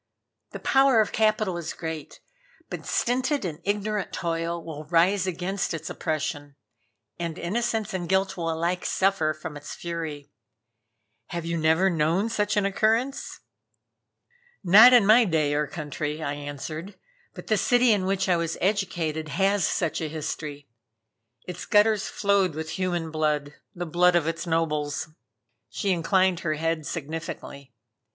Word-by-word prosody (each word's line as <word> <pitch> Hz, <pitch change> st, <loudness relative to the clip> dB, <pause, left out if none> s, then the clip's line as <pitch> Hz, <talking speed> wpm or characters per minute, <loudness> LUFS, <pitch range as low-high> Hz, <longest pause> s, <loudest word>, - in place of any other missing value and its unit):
The -, -, -8 dB
power 270 Hz, -3 st, +4 dB
of 215 Hz, -, +2 dB
capital 215 Hz, -4 st, +1 dB
is 170 Hz, -, -5 dB
great, 160 Hz, -3 st, -7 dB, 0.5 s
but -, -, -6 dB
stinted 255 Hz, +1 st, 0 dB
and 160 Hz, -3 st, -4 dB
ignorant 205 Hz, 0 st, -1 dB
toil 170 Hz, 0 st, -2 dB
will 155 Hz, -2 st, -7 dB
rise 180 Hz, +4 st, +2 dB
against 185 Hz, 0 st, -2 dB
its 165 Hz, -, -6 dB
oppression, 145 Hz, -2 st, -3 dB, 0.6 s
and 170 Hz, -1 st, -4 dB
innocence 220 Hz, +3 st, -2 dB
and 175 Hz, -2 st, -3 dB
guilt 190 Hz, 0 st, +1 dB
will 165 Hz, -2 st, -2 dB
alike 170 Hz, +3 st, -1 dB
suffer 190 Hz, -5 st, +1 dB
from 155 Hz, 0 st, -7 dB
its 145 Hz, 0 st, -8 dB
fury. 160 Hz, -4 st, -6 dB, 1.0 s
Have 170 Hz, -1 st, -5 dB
you 170 Hz, 0 st, -2 dB
never 160 Hz, +3 st, +3 dB
known 170 Hz, +5 st, +1 dB
such 210 Hz, -2 st, 0 dB
an 205 Hz, -, +2 dB
occurrence?" 225 Hz, +7 st, 0 dB, 1.2 s
"Not 210 Hz, +7 st, +9 dB
in 245 Hz, -5 st, +6 dB
my 220 Hz, +4 st, +7 dB
day 155 Hz, -7 st, +1 dB
or 150 Hz, 0 st, 0 dB
country," 150 Hz, -2 st, -4 dB
I 140 Hz, -, -2 dB
answered 145 Hz, +6 st, -6 dB, 0.4 s
"But -, -, -9 dB
the 220 Hz, -, +2 dB
city 245 Hz, +4 st, +4 dB
in 200 Hz, -3 st, +2 dB
which 195 Hz, 0 st, 0 dB
I 180 Hz, -2 st, +3 dB
was 165 Hz, -1 st, -2 dB
educated 170 Hz, -6 st, -1 dB
has 195 Hz, +2 st, +2 dB
such 170 Hz, -2 st, -1 dB
a 155 Hz, -, -2 dB
history. 150 Hz, -2 st, -5 dB, 0.8 s
Its 180 Hz, -1 st, -7 dB
gutters 210 Hz, 0 st, +3 dB
flowed 200 Hz, -5 st, +1 dB
with 160 Hz, 0 st, -5 dB
human 175 Hz, -4 st, -2 dB
blood, 150 Hz, -2 st, -1 dB, 0.2 s
the 175 Hz, 0 st, -4 dB
blood 175 Hz, +2 st, +3 dB
of 170 Hz, -3 st, +2 dB
its 165 Hz, +1 st, -3 dB
nobles." 155 Hz, -2 st, -1 dB, 0.6 s
She 195 Hz, -, -1 dB
inclined 185 Hz, +1 st, +2 dB
her 155 Hz, -4 st, -1 dB
head 165 Hz, -1 st, -2 dB
significantly. 155 Hz, -3 st, -6 dB
170 Hz, 145 wpm, -26 LUFS, 155-195 Hz, 1.2 s, Not